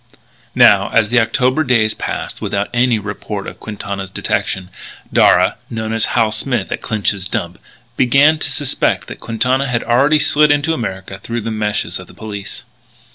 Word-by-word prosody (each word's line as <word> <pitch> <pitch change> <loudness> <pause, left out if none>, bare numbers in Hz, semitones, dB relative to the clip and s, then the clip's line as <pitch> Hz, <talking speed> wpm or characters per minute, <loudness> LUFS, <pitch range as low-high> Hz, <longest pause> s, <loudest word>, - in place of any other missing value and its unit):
Now, - - +5
as 110 -2 +2
the 125 +1 +4
October 130 +5 +1
days 115 -5 +2
passed - - -5
without 100 +1 -2
any 120 -1 +2
report 100 -1 -5
of - - -9
Quintana's 100 -2 -6
detention, 95 0 -2 0.4
Darragh, - - +4
known 110 -1 -4
as 115 -1 +2
Hal 110 -2 +3
Smith 120 -3 -2
at - - -3
Clinch's 100 -3 -1
dump, 85 -2 -3 0.4
began 140 +5 +4
to - - -2
suspect 145 -3 0
that - - -8
Quintana 130 +4 0
had 120 -2 -1
already 140 +6 +3
slid 150 0 +4
into 145 +2 +2
America 95 -7 -5
through 115 +4 -4
the 115 +1 -4
meshes 105 -1 -2
of - - -11
the - - -16
police. 105 -2 -7
115 Hz, 165 wpm, -17 LUFS, 105-130 Hz, 0.4 s, Now